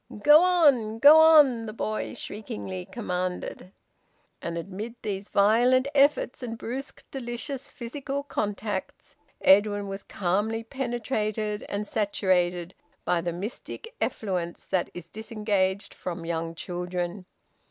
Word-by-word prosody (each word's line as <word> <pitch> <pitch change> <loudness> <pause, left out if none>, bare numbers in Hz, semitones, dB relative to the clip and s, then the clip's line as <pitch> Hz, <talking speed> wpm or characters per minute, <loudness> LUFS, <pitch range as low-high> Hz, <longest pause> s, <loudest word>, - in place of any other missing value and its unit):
"Go 300 +2 +8
on! 285 -12 +4
Go 290 +6 +9
on!" 290 -8 +6
The 215 - -6
boy 215 -1 -3
shriekingly 100 - -6
commanded. 180 -3 -4 0.7
And 170 0 -4
amid 200 +7 -6
these 200 -1 -4
violent 240 +6 +4
efforts 280 -2 +3
and 230 -2 -5
brusque 260 +5 -6
delicious 255 +1 -5
physical 275 +3 -5
contacts, 210 -5 -4 0.3
Edwin 205 +1 +4
was 195 0 -5
calmly 205 +6 -1
penetrated 220 -4 -2
and 205 +1 -2
saturated 185 -4 0 0.3
by 175 - +2
the 175 0 -2
mystic 220 - -7
effluence 180 -5 -2
that 185 - 0
is 175 -1 -8
disengaged 210 -2 -1
from 170 -2 -6
young 165 0 -3
children. 180 +2 -4
210 Hz, 115 wpm, -27 LUFS, 185-240 Hz, 0.7 s, Go